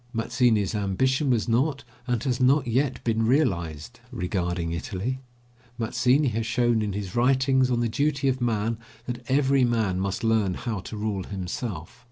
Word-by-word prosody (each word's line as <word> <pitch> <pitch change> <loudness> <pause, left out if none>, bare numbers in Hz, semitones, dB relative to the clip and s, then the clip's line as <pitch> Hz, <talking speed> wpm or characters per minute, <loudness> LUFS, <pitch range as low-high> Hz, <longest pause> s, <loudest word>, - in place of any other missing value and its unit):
Mazzini's 115 -3 +1
ambition 130 +8 +1
was 120 -3 +1
not, 135 +5 +1 0.2
and 120 -3 0
has 130 -3 0
not 135 +2 +4
yet 130 +3 0
been 115 -1 +1
realised, 110 - 0
regarding 90 -6 -2
Italy. 100 +9 -3 0.6
Mazzini 125 +4 +2
has 115 0 -2
shown 120 -1 +2
in 105 -2 -2
his 100 -2 -5
writings 130 +1 +3
on 120 -1 +1
the 120 - +1
duty 140 +3 0
of 130 -1 0
man 115 -1 0 0.3
that 125 -1 -5
every 135 0 +3
man 110 -6 +1
must 95 +2 -2
learn 110 -5 +2
how 110 -4 -3
to 105 +3 -7
rule 105 -3 -2
himself. 95 0 -5
115 Hz, 160 wpm, -26 LUFS, 100-130 Hz, 0.6 s, not